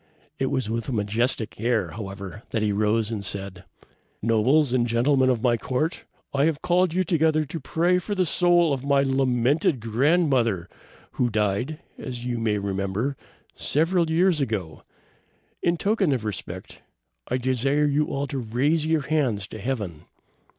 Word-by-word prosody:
It 135 Hz, -, +1 dB
was 130 Hz, -4 st, -1 dB
with 115 Hz, +3 st, -3 dB
a -, -, -2 dB
majestic 110 Hz, +1 st, -1 dB
air, 120 Hz, -1 st, +1 dB
however, 100 Hz, -1 st, -7 dB
that 110 Hz, -, -1 dB
he 105 Hz, -, +1 dB
rose 105 Hz, +2 st, +1 dB
and 105 Hz, -3 st, -3 dB
said: 95 Hz, -1 st, -5 dB, 0.5 s
"Nobles, 125 Hz, +6 st, +3 dB
and 120 Hz, -2 st, +2 dB
gentlemen 130 Hz, +3 st, +3 dB
of 120 Hz, -2 st, 0 dB
my 120 Hz, -2 st, +3 dB
court! 135 Hz, +8 st, -2 dB, 0.3 s
I 140 Hz, +1 st, +3 dB
have 160 Hz, -2 st, -1 dB
called 180 Hz, 0 st, +3 dB
you 185 Hz, +3 st, +1 dB
together 160 Hz, -2 st, +2 dB
to 165 Hz, +4 st, -6 dB
pray 175 Hz, +5 st, +1 dB
for 205 Hz, +3 st, -4 dB
the 185 Hz, -1 st, +2 dB
soul 175 Hz, -1 st, +3 dB
of 135 Hz, -1 st, -3 dB
my 140 Hz, 0 st, +3 dB
lamented 135 Hz, +1 st, +2 dB
grandmother, 120 Hz, -, +2 dB, 0.4 s
who 125 Hz, -, 0 dB
died, 105 Hz, +7 st, -1 dB, 0.2 s
as 125 Hz, -3 st, -6 dB
you 120 Hz, -1 st, -2 dB
may 110 Hz, -2 st, +1 dB
remember, 100 Hz, +6 st, -2 dB, 0.4 s
several 165 Hz, +2 st, +1 dB
years 170 Hz, -1 st, +3 dB
ago. 100 Hz, -, -3 dB, 0.8 s
In 170 Hz, 0 st, +1 dB
token 200 Hz, -3 st, +1 dB
of 120 Hz, -4 st, -2 dB
respect, 105 Hz, -3 st, -6 dB, 0.5 s
I 125 Hz, -, 0 dB
desire 130 Hz, +3 st, +1 dB
you 145 Hz, +1 st, +1 dB
all 140 Hz, +1 st, -2 dB
to 140 Hz, -1 st, -4 dB
raise 140 Hz, +7 st, +1 dB
your 160 Hz, -1 st, +2 dB
hands 130 Hz, -10 st, 0 dB
to 110 Hz, -, -8 dB
Heaven." 105 Hz, -9 st, -4 dB
130 Hz, 160 wpm, -25 LUFS, 110-155 Hz, 0.8 s, Nobles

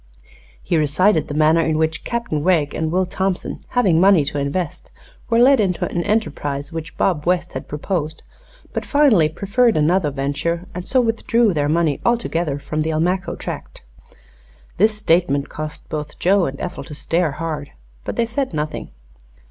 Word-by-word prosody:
He 170 Hz, -, +1 dB
recited 155 Hz, +3 st, +2 dB
the 145 Hz, -, -5 dB
manner 155 Hz, +2 st, +4 dB
in 160 Hz, -1 st, 0 dB
which 160 Hz, +1 st, -1 dB
Captain 235 Hz, -11 st, -2 dB
Wegg 160 Hz, -5 st, +2 dB
and 160 Hz, 0 st, -2 dB
Will 185 Hz, +2 st, +2 dB
Thompson, 190 Hz, 0 st, -3 dB
having 180 Hz, -9 st, +4 dB
money 190 Hz, -6 st, +5 dB
to 145 Hz, +1 st, -3 dB
invest, 145 Hz, +4 st, -3 dB, 0.4 s
were 230 Hz, -, +3 dB
led 260 Hz, +2 st, +6 dB
into 185 Hz, -5 st, +1 dB
an 170 Hz, -, -2 dB
enterprise 145 Hz, -9 st, -2 dB
which 165 Hz, +1 st, -6 dB
Bob 170 Hz, -4 st, 0 dB
West 180 Hz, -1 st, +1 dB
had 130 Hz, -, -6 dB
proposed, 155 Hz, +1 st, -3 dB, 0.5 s
but -, -, -2 dB
finally 255 Hz, -, +4 dB
preferred 210 Hz, +7 st, +1 dB
another 155 Hz, +1 st, +2 dB
venture 145 Hz, +5 st, -2 dB
and 180 Hz, -, -5 dB
so 260 Hz, -, +1 dB
withdrew 230 Hz, -1 st, +2 dB
their 145 Hz, -2 st, 0 dB
money 160 Hz, -2 st, +1 dB
altogether 175 Hz, -11 st, 0 dB
from 150 Hz, +2 st, -3 dB
the 155 Hz, -, -1 dB
Almaquo 180 Hz, +5 st, 0 dB
tract. -, -, -7 dB, 0.9 s
This 215 Hz, +3 st, +3 dB
statement 165 Hz, -8 st, +1 dB
caused 155 Hz, 0 st, -7 dB
both 150 Hz, -1 st, -5 dB
Joe 190 Hz, 0 st, +3 dB
and 135 Hz, +1 st, -6 dB
Ethel 180 Hz, 0 st, -5 dB
to 150 Hz, -, -9 dB
stare 165 Hz, 0 st, 0 dB
hard, 155 Hz, -3 st, -4 dB, 0.3 s
but -, -, -4 dB
they 235 Hz, -, +1 dB
said 240 Hz, -, -3 dB
nothing. 150 Hz, 0 st, -3 dB
165 Hz, 165 wpm, -20 LUFS, 150-195 Hz, 0.9 s, led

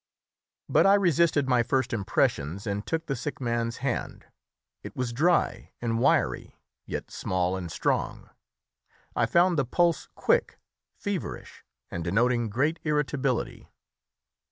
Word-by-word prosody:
But -, -, +4 dB
I 200 Hz, -, +7 dB
resisted 170 Hz, -6 st, +3 dB
my 125 Hz, -2 st, +4 dB
first 130 Hz, +1 st, 0 dB
impressions 95 Hz, -4 st, 0 dB
and 100 Hz, -1 st, -2 dB
took 165 Hz, +4 st, -2 dB
the 135 Hz, -, -2 dB
sick 145 Hz, +4 st, -5 dB
man's 115 Hz, -2 st, -1 dB
hand. -, -, -3 dB, 0.6 s
It -, -, -9 dB
was 125 Hz, -2 st, -2 dB
dry 170 Hz, +8 st, +1 dB
and 115 Hz, -1 st, -1 dB
wiry, -, -, +1 dB, 0.3 s
yet -, -, -5 dB
small 90 Hz, 0 st, -1 dB
and 90 Hz, -3 st, -5 dB
strong; -, -, -2 dB, 0.8 s
I 115 Hz, -, +2 dB
found 170 Hz, +2 st, +3 dB
the -, -, +3 dB
pulse 170 Hz, +6 st, +1 dB
quick, 480 Hz, 0 st, +1 dB, 0.4 s
feverish, 205 Hz, -4 st, -5 dB, 0.3 s
and 85 Hz, -, -4 dB
denoting 115 Hz, +6 st, +1 dB
great 145 Hz, +10 st, 0 dB
irritability. 140 Hz, -4 st, -1 dB
125 Hz, 130 wpm, -27 LUFS, 115-160 Hz, 0.8 s, I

